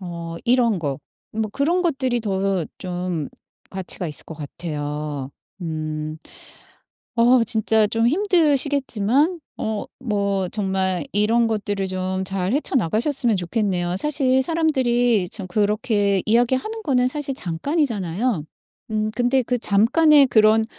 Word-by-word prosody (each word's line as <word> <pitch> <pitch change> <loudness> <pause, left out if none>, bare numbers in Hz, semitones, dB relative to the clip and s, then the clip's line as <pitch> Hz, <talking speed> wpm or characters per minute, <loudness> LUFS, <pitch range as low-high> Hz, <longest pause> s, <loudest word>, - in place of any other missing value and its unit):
어 170 -2 -6
이런 235 -5 +3
거 140 -3 -3 0.4
뭐 220 - +1
그런 335 +8 +1
것들이 260 -8 0
더 195 -4 -1
좀 180 -4 -3 0.4
가치가 185 -1 -2
있을 150 -3 -4
것 160 - -9
같아요. 150 -2 -5 0.3
음. 155 -1 -4 1.0
어 240 +1 +5
진짜 220 -2 +2
좀 225 +2 +1
힘드시겠지만 290 - +2 0.2
어 220 -1 -3 0.2
뭐 200 -5 -1
정말 190 -3 -1
이런 225 +3 +2
것들을 205 -3 -2
좀 185 0 -2
잘 190 0 -2
헤쳐 285 0 -1
나가셨으면 235 - +2
좋겠네요. 180 -2 -1
사실 265 0 +2
사람들이 245 - +1
참 195 -4 -6
그렇게 205 0 +1
이야기하는 260 - +1
거는 250 -6 +2
사실 285 -1 -3
잠깐이잖아요. 205 - -1 0.5
음 215 0 0
근데 250 +2 +2
그 245 +1 -1
잠깐의 275 +9 +5
그런 220 -1 +4
215 Hz, 255 characters per minute, -22 LUFS, 185-255 Hz, 1.0 s, 어